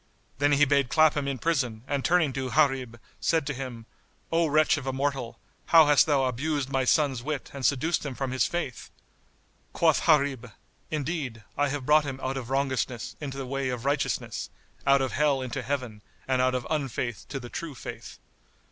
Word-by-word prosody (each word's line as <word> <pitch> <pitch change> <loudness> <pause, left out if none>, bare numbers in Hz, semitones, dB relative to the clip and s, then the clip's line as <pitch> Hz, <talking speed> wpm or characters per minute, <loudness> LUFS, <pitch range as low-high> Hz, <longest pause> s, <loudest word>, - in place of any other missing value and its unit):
Then 145 +1 +3
he 145 +1 +5
bade 140 -2 +2
clap 155 +1 +4
him 145 -2 -1
in 135 -1 -2
prison 125 -7 -1
and 140 -2 -1
turning 170 -5 +3
to 130 -1 -3
Gharib, 130 -5 +1 0.2
said 165 -3 +1
to 145 - -2
him, 125 -3 -7 0.5
"O 165 0 +3
wretch 155 +1 +4
of 135 -2 -6
a - - +1
mortal, 135 -3 -2 0.3
how 165 -2 +7
hast 145 +1 +5
thou 140 -3 +3
abused 135 +2 -2
my 135 -1 +1
son's 135 -3 +2
wit 145 +1 -4
and 140 -1 -7
seduced 145 +6 +1
him 140 -4 -5
from 135 0 -3
his 130 - +1
Faith?" 155 -9 -4 0.8
Quoth 160 -1 +2
Gharib, 140 -6 +2 0.4
"Indeed, 145 -7 -3
I 145 0 +2
have 140 -2 -4
brought 150 +2 +5
him 135 -2 -5
out 130 +1 -1
of 130 -3 -5
wrongousness 130 -3 -1
into 135 -2 -5
the 135 - -4
way 135 0 -2
of 125 0 -4
righteousness, 140 0 -1 0.4
out 140 0 +5
of 130 - -2
Hell 145 -1 +2
into 130 -3 -4
Heaven 125 -7 -4 0.3
and 130 -1 +2
out 130 0 +2
of 125 - -2
unfaith 130 -6 -2
to 135 - -4
the 120 -1 -9
True 160 -1 -6
Faith." - - -8
135 Hz, 190 wpm, -27 LUFS, 130-150 Hz, 0.8 s, how